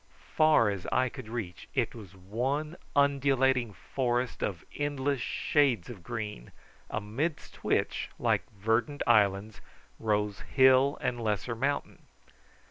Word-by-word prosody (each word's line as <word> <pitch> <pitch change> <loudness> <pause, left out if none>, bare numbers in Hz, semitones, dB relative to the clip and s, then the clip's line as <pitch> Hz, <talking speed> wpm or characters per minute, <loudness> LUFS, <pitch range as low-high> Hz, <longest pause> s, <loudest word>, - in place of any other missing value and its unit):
Far 155 -9 +5
as 95 -3 -5
eye 130 +1 +2
could 125 -3 -9
reach 110 -7 -6
it - - +1
was 100 -5 -11
one 130 - -2 0.2
undulating 135 -4 +3 0.2
forest 125 -1 0
of 90 -5 -3
endless 145 -2 -1
shades 130 - +1
of 100 -7 -10
green, 105 - -6 0.4
amidst 115 +10 -3
which, - - 0
like - - +2
verdant 115 +7 0
islands, 105 -2 +2 0.4
rose 105 -2 0
hill 130 +1 +4
and 120 -1 -1
lesser 110 +2 -1
mountain. 135 +5 -2
120 Hz, 120 wpm, -30 LUFS, 105-135 Hz, 0.4 s, Far